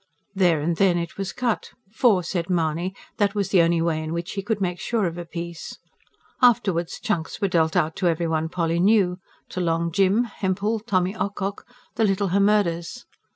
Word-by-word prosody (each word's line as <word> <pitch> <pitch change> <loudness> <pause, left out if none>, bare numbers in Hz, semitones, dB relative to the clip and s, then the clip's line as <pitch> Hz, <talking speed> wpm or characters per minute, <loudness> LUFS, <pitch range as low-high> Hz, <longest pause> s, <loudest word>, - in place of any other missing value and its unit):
There 175 -6 +3
and 165 +2 -1
then 185 -3 +3
it 170 -1 -4
was 195 -1 -2
cut; 240 -3 -2 0.2
for, 215 -5 +3
said 170 0 -3
Mahony, 170 +1 0 0.2
that 205 0 +1
was 200 -3 0
the 185 - +5
only 165 0 +2
way 160 -2 0
in 155 +1 -4
which 170 +2 -4
he 195 - -3
could 205 +1 -2
make 180 -2 -2
sure 230 -4 0
of 170 -1 -2
a 175 0 -6
piece. 170 0 -7 0.6
Afterwards 195 -9 +2
chunks 190 -9 -2
were 200 - +1
dealt 160 -3 +1
out 160 +1 +1
to 185 - +1
every 170 0 +1
one 160 0 -1
Polly 165 -1 -1
knew 190 -2 +3 0.3
to 185 - -4
Long 170 0 0
Jim, 195 +6 +3
Hempel, 205 0 -2
Tommy 190 -3 0
Ocock, 200 -1 -3 0.3
the 225 - +2
little 195 -1 +1
Hemmerdes. 200 +1 +1
180 Hz, 190 wpm, -24 LUFS, 170-200 Hz, 0.6 s, the